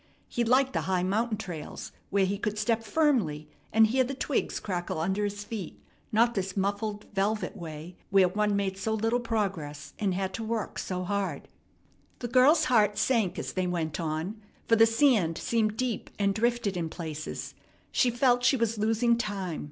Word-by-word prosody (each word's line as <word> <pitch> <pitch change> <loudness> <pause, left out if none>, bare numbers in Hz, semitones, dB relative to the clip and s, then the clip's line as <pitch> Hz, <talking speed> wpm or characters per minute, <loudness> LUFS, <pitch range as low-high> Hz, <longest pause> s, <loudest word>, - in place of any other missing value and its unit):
He 240 - -1
liked 260 +3 +3
the - - 0
high 185 -1 +2
mountain 215 +4 0
trails, 175 -7 -7 0.2
where 195 -1 +3
he 195 +1 -2
could 210 0 -2
step 225 +1 +1
firmly 220 - +1 0.2
and 220 +1 +6
hear 255 +4 +2
the 270 +2 -4
twigs 275 +1 -1
crackle 175 -4 -3
under 190 +5 0
his 205 0 -3
feet, 205 -5 -6 0.3
not 235 +2 +4
this 195 -1 -3
muffled, 205 +2 -1
velvet 210 +3 0
way 165 -1 -8
where 195 -2 +5
one 210 +2 +1
made 195 -1 -1
so 220 +2 0
little 225 +3 +1
progress 195 -11 -3
and 195 -4 0
had 190 0 -2
to 225 - -4
work 225 -1 -3
so 185 -1 -3
hard. 200 +1 -2 0.7
The 240 - -4
girl's 265 +6 +5
heart 210 -4 +3
sank 215 -8 +1
as - - -4
they 185 -1 0
went 165 -3 -2
on, 165 +6 -3 0.3
for 230 - +5
the 225 0 +6
sand 225 - +3
seemed 220 -3 0
deep 255 -3 -2
and 200 -1 +2
drifted 235 -2 0
in 165 -2 -2
places. 155 -3 -6 0.4
She 250 - +3
felt 245 0 +2
she 265 +2 +4
was 230 -2 0
losing 225 +2 +2
time. 195 -7 -3
210 Hz, 180 wpm, -28 LUFS, 185-230 Hz, 0.7 s, and